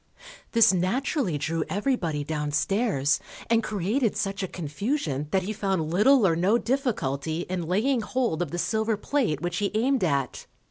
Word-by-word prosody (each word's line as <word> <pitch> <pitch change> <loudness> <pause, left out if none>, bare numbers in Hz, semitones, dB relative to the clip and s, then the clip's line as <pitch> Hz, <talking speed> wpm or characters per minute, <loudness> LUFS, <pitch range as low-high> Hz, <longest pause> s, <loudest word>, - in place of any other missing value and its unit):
_ - - -21 0.3
This 230 -4 +6
naturally 190 - 0
drew 160 +3 -1
everybody 185 - -1
downstairs, 150 - 0 0.3
and 230 -1 +4
created 215 +3 -1
such 195 -1 -2
a 190 - -2
confusion 155 - -3
that 190 +3 +1
he 210 +4 -3
found 190 -6 -1
little 225 +5 +5
or 165 -3 +3
no 190 +7 +3
difficulty 175 - -1
in 175 -2 -4
laying 230 +8 +1
hold 230 -8 -1
of 175 - -1
the 175 - -4
silver 220 +3 0
plate 225 - -1
which 175 0 -2
he 200 0 0
aimed 250 +1 +2
at. 140 -6 -1
190 Hz, 165 wpm, -26 LUFS, 160-230 Hz, 0.3 s, This